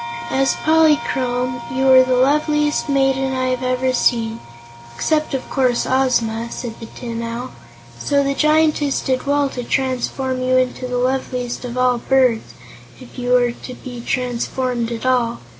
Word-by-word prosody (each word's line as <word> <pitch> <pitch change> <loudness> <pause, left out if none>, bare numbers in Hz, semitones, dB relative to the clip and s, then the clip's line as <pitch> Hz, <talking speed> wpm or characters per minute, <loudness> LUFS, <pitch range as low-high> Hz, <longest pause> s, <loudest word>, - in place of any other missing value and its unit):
"As 270 0 +2
Polychrome, 250 -6 +1
you 255 +2 -1
were 260 -1 +8
the 255 0 +1
loveliest 300 +3 +1
maiden 270 -1 +1
I 255 0 0
have 255 -1 -1
ever 255 0 0
seen 230 -2 +1 0.6
except, 305 - 0
of 260 - -5
course, 250 -3 +1
Ozma," 235 -3 +1
said 235 -2 -7
the 225 - -8
Tin 230 -1 -6
Owl; 235 +2 -5 0.5
"so 280 - +1
the 275 0 0
Giantess 305 -1 +2
did 260 0 -2
well 285 0 +2
to 250 -2 -5
transform 260 0 -1
you 255 0 +2
into 255 0 -1
the 250 0 -2
loveliest 250 -1 -2
of 245 0 -6
all 250 -1 +2
birds, 255 -3 +1 0.4
if 255 0 -12
you 245 0 0
were 245 -1 +3
to 250 +1 -10
be 245 -1 -9
transformed 245 -1 -2
at 235 +1 -5
all. 245 -2 +1
255 Hz, 160 wpm, -19 LUFS, 245-270 Hz, 0.6 s, were